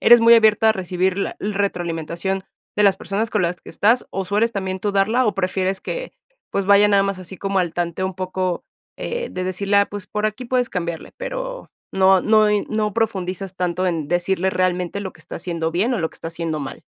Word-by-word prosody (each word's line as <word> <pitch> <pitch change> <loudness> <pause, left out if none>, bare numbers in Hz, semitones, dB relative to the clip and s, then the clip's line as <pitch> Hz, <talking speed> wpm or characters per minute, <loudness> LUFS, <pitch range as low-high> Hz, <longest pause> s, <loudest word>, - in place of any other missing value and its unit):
eres 240 0 +8
muy 230 +1 +8
abierta 220 -1 +5
a - - +4
recibir 185 0 -1
la - - -2
retroalimentación 190 -2 -2 0.4
de 210 - +3
las 195 -1 +5
personas 215 +3 -2
con 210 -4 +1
las 175 +1 -1
que - - -14
estás 225 +9 +2
o 195 0 -3
sueles 210 +5 +1
también 190 -1 -3
tú 205 0 -1
darla 220 +6 +3
o 205 - +1
prefieres 190 0 -1
que, - - -5 0.4
pues 195 -1 -1
vaya 205 +1 +6
nada 200 -1 +4
más 195 -1 -2
así 185 +1 -8
como 195 +1 -1
al 175 -3 0
tanteo 175 +2 -2
un 190 - -5
poco 185 -1 -2 0.3
eh, 480 0 -3
de 185 - -3
decirle, 195 +2 0
ah, 200 - +5
pues 205 -2 -7
por 210 0 -3
aquí 215 +4 -4
puedes 250 0 +1
cambiarle, 170 -3 -4
pero - - -5 0.2
no 190 -1 +5
no 215 -1 +4
y 210 -1 +2
no 215 -1 0
profundizas 190 -4 -2
tanto 180 0 -1
en 165 -4 -1
decirle 185 +1 +1
realmente 185 +1 0
lo 190 -2 -5
que - - -19
está - - -8
haciendo 165 -2 -2
bien, 220 +9 +1
o - - -1
lo 160 -1 0
que - - -19
está 165 - -6
haciendo 165 -2 -3
mal. 135 - -7
195 Hz, 220 wpm, -21 LUFS, 180-210 Hz, 0.4 s, eres